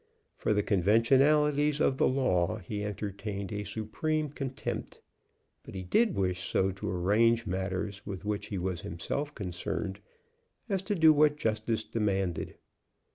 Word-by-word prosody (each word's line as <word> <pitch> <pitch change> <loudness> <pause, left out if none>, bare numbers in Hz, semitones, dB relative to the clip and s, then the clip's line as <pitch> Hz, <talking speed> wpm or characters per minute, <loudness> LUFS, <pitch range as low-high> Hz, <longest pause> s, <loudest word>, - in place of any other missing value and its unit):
For 105 - 0
the 105 - +2
conventionalities 140 - +3
of 135 -3 +2
the - - +5
law 110 -9 +1
he 105 +1 -5
entertained 100 -1 -4
a 105 0 -3
supreme 130 - -2
contempt, 135 -2 -5 0.6
but - - -11
he 95 - -4
did 210 - +2
wish 95 0 -1
so 95 0 +2
to 95 - -5
arrange 110 +6 +3
matters 95 +1 -3
with 100 -1 -7
which 105 0 -2
he 100 - -4
was 90 -1 -2
himself 140 - -4
concerned 95 +1 -4 0.7
as 195 -2 0
to 205 +1 -2
do 160 -3 +7
what 150 0 +4
justice 110 -2 -1
demanded. 95 -6 -1
105 Hz, 140 wpm, -30 LUFS, 95-135 Hz, 0.7 s, do